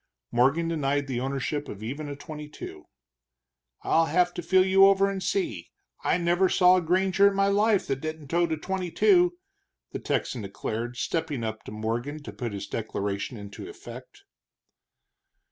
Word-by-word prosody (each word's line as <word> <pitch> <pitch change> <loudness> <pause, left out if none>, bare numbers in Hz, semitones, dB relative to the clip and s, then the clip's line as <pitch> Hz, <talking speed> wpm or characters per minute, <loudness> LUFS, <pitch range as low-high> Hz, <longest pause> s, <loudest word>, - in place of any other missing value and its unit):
Morgan 135 +8 +3
denied 145 -3 0
the 130 -3 -3
ownership 140 +2 -2
of 105 +1 -8
even 145 +6 -5
a 145 - -5
twenty 150 +1 -8
two. - - -9 1.0
"I'll 165 0 +3
have 175 +3 +2
to - - -4
feel 185 +3 +4 0.2
over 195 0 +6
you 195 - 0
and 195 -1 -4
see 115 - -2 0.3
I - - +2
never 175 +2 +2
saw 180 0 +5
a - - +1
granger 190 +3 +3
in 200 - +1
my 195 0 +3
life 205 0 +3
that 135 0 -2
didn't 155 -2 -6
tote 170 0 +1
a 160 - 0
twenty 185 +2 -3
two," 355 - +4 0.5
the - - -4
Texan 125 - -2
declared, 110 +4 -4
stepping 145 0 -2
up 110 -1 -4
to - - -8
Morgan 120 +8 -3
to - - -8
put 120 -3 -4
his 100 0 -5
declaration 100 0 -3
into 100 -1 -9
effect. - - -11
155 Hz, 170 wpm, -27 LUFS, 120-180 Hz, 1.0 s, over